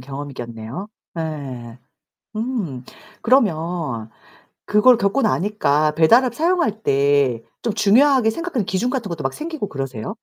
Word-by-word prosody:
경험이겠네요. 130 - -7 0.3
네. 135 -7 -6 0.6
음. 215 - -3 0.4
그러면 165 - 0 0.6
그걸 225 +4 +5
겪고 200 +5 +1
나니까 155 -8 +1
배달 165 +11 +5
앱 250 - -2
사용할 325 - 0
때 140 -4 +2 0.2
좀 225 - 0
중요하게 230 +4 +4
생각하는 285 - -3
기준 190 +7 -1
같은 250 -4 -2
것도 165 -5 -5
막 135 - -1
생기고 315 -8 -5
그러세요? 135 -5 -5
175 Hz, 280 characters per minute, -21 LUFS, -, 0.6 s, 그걸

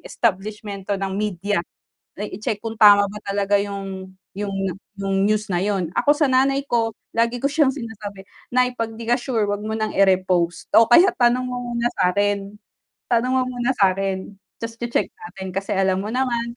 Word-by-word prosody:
establishment 205 -2 -3
'to 200 - +1
ng 195 0 -3
media. 200 -1 -1 0.6
Eh, 210 -2 -4
i-check 210 0 -3
kung 225 0 -5
tama 205 -2 +7
ba 205 - -9
talaga 200 0 +1
yung 195 -2 -4 0.2
yung 205 0 -3 0.5
yung 195 0 +1
news 215 +1 +1
na 180 0 0
yun. 195 -5 0
Ako 290 - +4
sa 295 -1 +2
nanay 270 +1 +3
ko, 230 -1 +1 0.2
lagi 235 +1 +1
ko 280 - +1
siyang 285 -2 +2
sinasabi, 220 -6 -7 0.3
"Nay, 250 0 +2
'pag 225 -1 -3
'di 225 +1 -8
ka 240 - +4
sure, 240 -5 -1
wag 205 +1 -2
mo 220 - -3
ng 220 -1 -2
ire-repost 185 -3 +2
o 230 - +9
kaya 345 +10 +7
tanong 245 0 +3
mo 250 - -4 0.2
muna 235 0 +1
sa'kin, 200 +2 +1 0.6
tanong 240 +2 +2
mo 260 - +3
muna 250 0 -1
sa'kin 195 0 0 0.2
tas 230 0 -5
che-check 235 0 -1
natin." 195 - -9
Kasi 195 +2 -2
alam 190 -1 +2
mo 205 - -4
naman, 235 -1 -1
210 Hz, 180 wpm, -22 LUFS, 195-240 Hz, 0.6 s, o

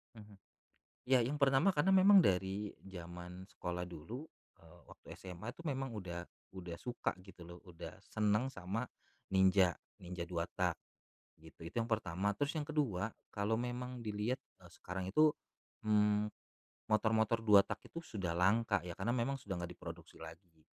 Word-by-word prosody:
Mhm. 105 -2 -12 0.7
Ya, 130 0 +5
yang 135 +6 0
pertama 140 +8 +5
karena 175 +6 +3
memang 190 +1 +8
dari 95 - +1
jaman 90 0 -8
sekolah 90 0 -4
dulu, 110 - -7 0.4
eee, 85 +1 -17
waktu - - -16
SMA 95 +4 -7
itu 170 - -12
memang 135 -3 -1
udah, 90 -4 -5 0.3
udah 90 -2 -6
suka, 120 +5 -2
gitu 95 -2 -14
lo, 85 +1 -9
udah 85 -2 -9
seneng 110 +4 +1
sama 95 +6 -3 0.5
Ninja, 95 -1 +5 0.3
Ninja 90 -1 -5
2 85 -1 -2
tak, - - +1 0.6
gitu. 80 +1 -14
Itu 85 +2 -8
yang 115 - 0
pertama. 100 -2 +1
Terus 145 +7 -1
yang 145 - -4
ke-2, 115 - 0 0.2
kalau 105 +2 0
memang 125 +1 -3
dilihat, 110 +4 -1 0.2
eee, - - -15
sekarang 90 +1 -5
itu, 155 +7 +6 0.6
mmm, 105 0 +4 0.6
motor-motor 110 +1 +3
2 105 -2 +8
tak - - -4
itu 165 - -6
sudah 95 - -3
langka 100 +3 +3
ya, 90 -1 -6
karena 105 +5 0
memang 125 +3 +1
sudah 95 -6 -4
nggak 85 0 -4
diproduksi - - -9
lagi. 80 0 -12
105 Hz, 155 wpm, -36 LUFS, 90-120 Hz, 0.7 s, memang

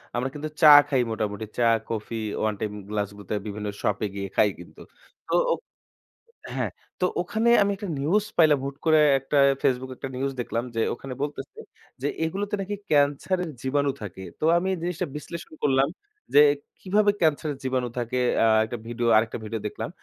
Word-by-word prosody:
আমরা 125 +2 -1
কিন্তু 150 +1 -5
চা 155 - +9 0.2
খাই 135 -3 +2
মোটামুটি। 110 -1 -3
চা, 120 - +3 0.2
কফি, 115 0 -4 0.2
1 110 0 +1
টাইম 105 - -2 0.2
গ্লাসগুলোতে 105 -1 -3
বিভিন্ন 105 0 -5
শপে 105 +1 0
গিয়ে 100 0 -3
খাই 105 - +4
কিন্তু, - - -13 0.5
তো - - -3 1.2
হ্যা, - - 0 0.3
তো 180 - +2 0.2
ওখানে 220 +6 0
আমি 200 - +3
একটা 200 +1 -6
নিউজ 190 +9 +2
পাইলাম 155 -4 +5
হুট 140 0 -4
করে 155 -1 +5 0.2
একটা 135 +2 -1 0.3
ফেসবুকে, 130 0 0
একটা 135 - -5
নিউজ 135 +2 -1
দেখলাম 115 0 -2
যে, 115 - +1
ওখানে 130 +2 -7
বলতেছে, 145 -1 -5 0.4
যে 140 - 0 0.2
এগুলোতে 200 +5 -2
নাকি 205 +2 -3 0.2
ক্যান্সারের 150 +5 +2
জীবাণু 140 +1 +1
থাকে। 95 -2 -7 0.2
তো - - -6
আমি 180 +2 -1
এ 185 - -3
জিনিসটা 180 +1 -2
বিশ্লেষণ 160 +2 -8
করলাম 135 -1 +3 0.5
যে, 145 - +10 0.4
কিভাবে 205 +2 +3
ক্যান্সারের 155 -2 +1
জীবাণু 130 -1 -1
থাকে? 120 +1 -2 0.3
আ - - +5 0.2
একটা 120 +2 -5
ভিডিও, 120 0 -2
আরেকটা 110 +1 0
ভিডিও 110 0 -4
দেখলাম। - - -5
135 Hz, 170 wpm, -25 LUFS, 115-160 Hz, 1.2 s, যে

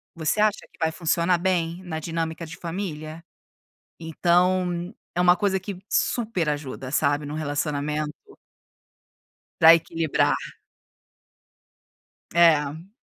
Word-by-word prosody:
"você 165 +5 -1
acha 215 -1 +2
que - - -24
vai 160 0 +1
funcionar 170 +1 +1
bem, 175 -1 -1
na 160 -3 -4
dinâmica 165 +1 -3
de 165 +3 -10
família?". 165 -3 -6 0.8
Então, 175 +2 +1 0.2
é 180 - +2
uma 180 0 +6
coisa 195 -2 +1
que 190 -1 -7
super 215 -9 0
ajuda, 135 -3 -5
sabe, 145 +1 +1
em 145 - -6
um - - -4
relacionamento 150 0 -2 1.5
para 165 +1 +9
equilibrar. 165 -2 +1 2.0
É. 160 0 +3
165 Hz, 110 wpm, -24 LUFS, 155-180 Hz, 2.0 s, para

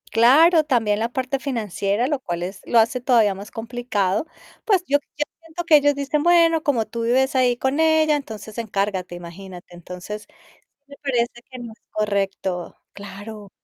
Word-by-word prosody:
Claro, 310 +8 +5
también 225 -7 +1
la 230 - 0
parte 260 +2 -3
financiera, 215 - -1
lo 290 -1 -1
cual 175 -8 -4
es 190 +2 -6
lo 235 - +4
hace 230 +3 +2
todavía 230 -5 +3
más 200 +2 -9
complicado. 225 - -2 0.4
Pues, 390 -6 +3
yo 285 - +3 0.2
yo 295 - 0 0.2
siento 330 +1 -7
que 320 -2 +6
ellos 290 0 +2
dicen: 285 +1 -1
"Bueno, 335 -1 +4
como 245 -7 +1
tú 230 +1 -5
vives 260 +3 +2
ahí 250 -1 +3
con 265 +4 -1
ella, 315 -1 +4
entonces 220 -5 -9
encárgate". 200 -5 -2
Imagínate. 175 +1 -11
Entonces, 180 +4 -8 0.6
me 280 0 -13
parece 240 -3 -1
que 255 - -9
no 235 -2 -8
es - - -41
correcto. 195 -4 -2 0.2
Claro. 205 +1 -10
235 Hz, 165 wpm, -22 LUFS, 200-280 Hz, 0.6 s, que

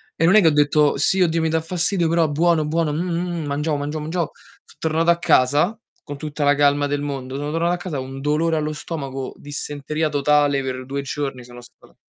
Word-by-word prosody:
E 165 - -1
non 175 +5 +5
è - - +9
che 170 - +4
ho - - +6
detto: 150 0 +3
"Sì, 190 +7 +2
oddio, 165 -1 +2
mi 160 - +1
dà 160 0 +1
fastidio, 175 +1 0
però 165 -1 +2
buono, 160 +1 +2
buono, 155 -1 0
mh, 160 - -1
mh, 175 -1 -2
mh, - - -5
mangiavo, 150 +2 -1
mangiavo, 145 +2 -3
mangiavo". 165 +3 -2 0.3
So' - - -21
tornato 160 +1 +1
a 170 - +5
casa, 155 - +3 0.3
con 145 0 -7
tutta 150 0 -3
la 145 0 +4
calma 145 0 +3
del 145 0 -2
mondo, 135 -2 -5
sono 145 +1 -3
tornato 170 +2 +1
a - - -1
casa, 175 -6 -5
un 135 +1 -7
dolore 155 +3 +1
allo 155 0 -1
stomaco, 135 -4 -5
dissenteria 145 +2 -3
totale 145 -1 +2
per 130 -1 -4
2 140 +1 -3
giorni 135 -2 -4
sono 120 0 -12
st 120 - -19
150 Hz, 225 wpm, -21 LUFS, 145-165 Hz, 0.3 s, è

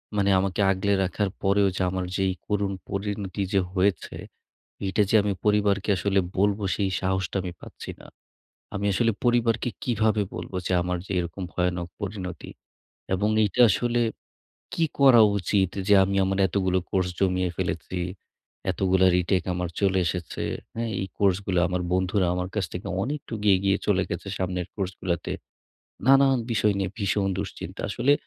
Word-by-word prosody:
মানে 100 -1 +2
আমাকে 95 +1 -1
আগলে 100 +2 +1
রাখার 95 +2 -1
পরেও 100 +1 +3
যে - - -2
আমার 95 0 -2
যেই 95 -1 +1
করুণ 100 -1 0 0.2
পরিণতি 100 0 -3
যে 100 - +4
হয়েছে 95 -1 0 0.7
এটা 105 +2 +2
যে - - +1
আমি 100 0 0
পরিবারকে 105 -1 +2
আসলে 100 0 +2 0.2
বলব 100 +1 +3 0.2
সেই 100 -2 0
সাহসটা 95 0 -1
আমি 90 -1 -5
পাচ্ছি - - -9
না। - - -12 0.7
আমি 100 +1 -2
আসলে 115 +2 +2
পরিবারকে 120 -1 +2
কিভাবে 110 -3 +1
বলব - - -6 0.2
যে - - -2
আমার 90 0 -1
যে - - -8
এরকম 90 +2 -4
ভয়ানক 90 -1 -1
পরিণতি! 95 -3 -5 0.7
এবং 105 +3 +1
এইটা 105 +4 0
আসলে 120 +4 +1 0.7
কি 165 - +2
করা 130 -4 +7 0.2
উচিত? 95 0 +1 0.2
যে 105 - +7
আমি 100 +1 -1
আমার 95 +1 -1
এতগুলো 95 +1 +1
কোর্স 95 -2 +1
জমিয়ে 90 -1 +1
ফেলেছি, 90 0 -3 0.7
এতগুলো 95 0 +2
রিটেক 90 0 +1
আমার 90 -1 -2
চলে 95 -1 +2
এসেছে, 90 0 -3 0.3
হ্যা। 115 +1 -2 0.2
এই 95 - -2
কোর্সগুলো 95 -2 +1
আমার 90 0 -1
বন্ধুরা 95 +1 +1
আমার 90 0 -2
কাছ 105 -3 0
থেকে 90 +2 -6 0.2
অনেকটা 140 -3 -4 0.2
এগিয়ে 95 +1 +2
চলে 95 -3 +3
গেছে - - -4
সামনের 90 -1 -2
কোর্সগুলাতে, 90 -3 -3 0.8
নানান 135 -1 +6
বিষয় 105 -2 +2
নিয়ে 95 -1 -1
ভীষণ 100 -1 +1
দুশ্চিন্তা - - -6
আসলে 125 +7 +2
95 Hz, 155 wpm, -25 LUFS, 90-105 Hz, 0.8 s, করা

